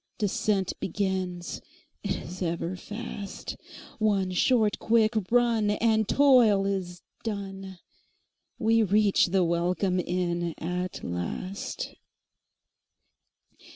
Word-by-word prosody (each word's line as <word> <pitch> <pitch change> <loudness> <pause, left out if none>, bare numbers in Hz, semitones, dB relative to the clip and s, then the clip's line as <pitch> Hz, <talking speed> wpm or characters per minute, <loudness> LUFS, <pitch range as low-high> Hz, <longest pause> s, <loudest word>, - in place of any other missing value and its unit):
Descent 205 -2 0
begins, 185 -2 -2 0.4
't - - -1
is 180 +3 -9
ever 170 +1 -2
fast—One 205 -1 -4
short 215 +3 +2
quick 220 0 +3 0.2
run, 235 -3 +3
and 220 0 +2
toil 245 -8 +5
is 185 -3 -3 0.2
done, 195 -3 -5 0.8
We 225 0 +3
reach 205 -1 +3
the 185 +1 +2
welcome 180 +2 +1
inn 175 -1 -1
at 180 +2 -4
last. 90 - -4
195 Hz, 85 wpm, -27 LUFS, 180-215 Hz, 0.8 s, toil